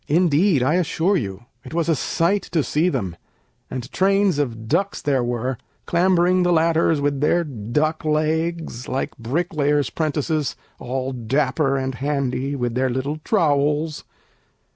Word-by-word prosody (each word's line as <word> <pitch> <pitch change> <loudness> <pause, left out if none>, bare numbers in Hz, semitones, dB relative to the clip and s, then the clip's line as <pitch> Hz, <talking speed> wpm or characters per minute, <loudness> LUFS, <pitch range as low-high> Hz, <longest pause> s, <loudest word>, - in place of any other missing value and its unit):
Indeed, 165 -1 +3
I 140 +5 +2
assure 180 +2 +1
you, 100 - -3 0.2
it - - -8
was 170 -1 +1
a 165 - +3
sight 170 +8 +1
to 160 -4 +2
see 160 +6 +1
them; 95 - -3 0.5
And 125 0 -6
trains 195 -3 +2
of 115 -6 -3
ducks 200 - 0
there 135 -4 +1
were, 120 +1 -2 0.3
clambering 180 +1 +3
the 175 0 +2
ladders 165 -1 +3
With 140 -1 0
their 170 +3 +3
duck 150 +4 -2
legs, 155 -3 -1
like 130 +1 -2
bricklayers' 145 - 0
'prentices, 155 -1 -1 0.2
All 130 +1 -3
dapper 135 +3 0
and 130 0 -2
handy, 135 0 -1
with 120 -3 -2
their 130 +2 +1
little 130 +4 -2
trowels. 150 -4 +1
150 Hz, 140 wpm, -22 LUFS, 130-165 Hz, 0.5 s, Indeed